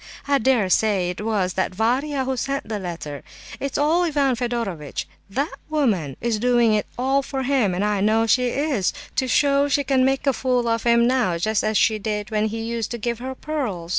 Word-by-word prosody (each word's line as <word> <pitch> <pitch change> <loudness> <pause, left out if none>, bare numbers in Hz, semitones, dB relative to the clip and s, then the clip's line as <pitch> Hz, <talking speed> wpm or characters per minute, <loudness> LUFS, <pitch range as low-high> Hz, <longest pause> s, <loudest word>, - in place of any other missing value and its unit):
I 280 -1 +3
dare 235 -4 +2
say 190 -2 +2
it 180 - -7
was 200 -5 0
that 185 0 -1
Varia 260 +6 0
who 265 0 -1
sent 275 +2 -3
the 210 -1 -3
letter. 165 -6 -6 0.4
It's 275 -1 -3
all 310 +4 +3
Ivan 285 -6 +1
Fedorovitch. 230 - -3 0.2
That 280 +10 -2 0.2
woman 210 - 0
is 230 -2 -1
doing 240 -1 +3
it 210 -1 0
all 265 +2 +2
for 270 -1 -4
him, 250 -9 +1
I 205 +1 0
know 220 +2 +3
she 250 +2 +3
is, 270 - 0 0.2
to 260 - +1
show 280 +1 +3
she 285 0 +1
can 265 -1 +2
make 270 +2 +1
a 275 - +3
fool 250 -1 0
of 230 0 0
him 235 0 +4
now 240 -9 +1
just 215 +5 0
as 215 -1 +1
she 220 -2 +3
did 210 0 -3
when 215 0 +1
he 225 +1 -4
used 230 -1 -3
to 240 - -4
give 235 +1 -3
her 260 +1 -5
pearls. 245 - -4
235 Hz, 205 wpm, -22 LUFS, 210-270 Hz, 0.4 s, him